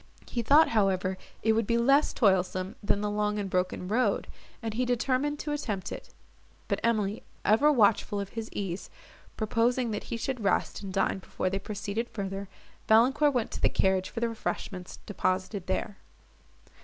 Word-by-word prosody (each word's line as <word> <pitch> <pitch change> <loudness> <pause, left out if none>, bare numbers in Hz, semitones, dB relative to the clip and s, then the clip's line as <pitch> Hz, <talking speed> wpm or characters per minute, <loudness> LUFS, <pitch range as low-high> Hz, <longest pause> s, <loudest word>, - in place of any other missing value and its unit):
He 240 - -2
thought, 290 +7 +6
however, 190 -3 +1 0.3
it 220 - +4
would 225 -1 +1
be 235 - +2
less 275 +5 +4
toilsome 190 -2 +1
than 205 -1 +1
the 210 - -1
long 210 0 0
and 205 -1 -2
broken 180 0 -1
road, 215 0 +1 0.3
and 225 -1 -4
he 245 +3 0
determined 255 +4 0
to 295 - -4
attempt 215 -10 -3
it; - - -7 0.6
but - - 0
Emily, 215 -3 +1 0.2
ever 230 +9 +5
watchful 210 -4 +3
of 200 -1 -4
his 225 -1 -6
ease, 195 -2 -4 0.5
proposing 230 +2 +1
that 210 - -4
he 235 - -4
should 245 -1 -3
rest, 200 - 0
and 195 -2 -6
dine 195 0 +1
before 185 0 -3
they 195 - -1
proceeded 205 +3 -4
further, 195 -1 -5 0.4
Valancourt 265 +6 +4
went 235 -3 0
to - - -6
the - - +4
carriage 190 -1 +1
for 230 - -5
the 235 - +1
refreshments 190 -4 -5
deposited 185 -1 -2
there. 205 -2 -2
210 Hz, 170 wpm, -29 LUFS, 195-235 Hz, 0.6 s, thought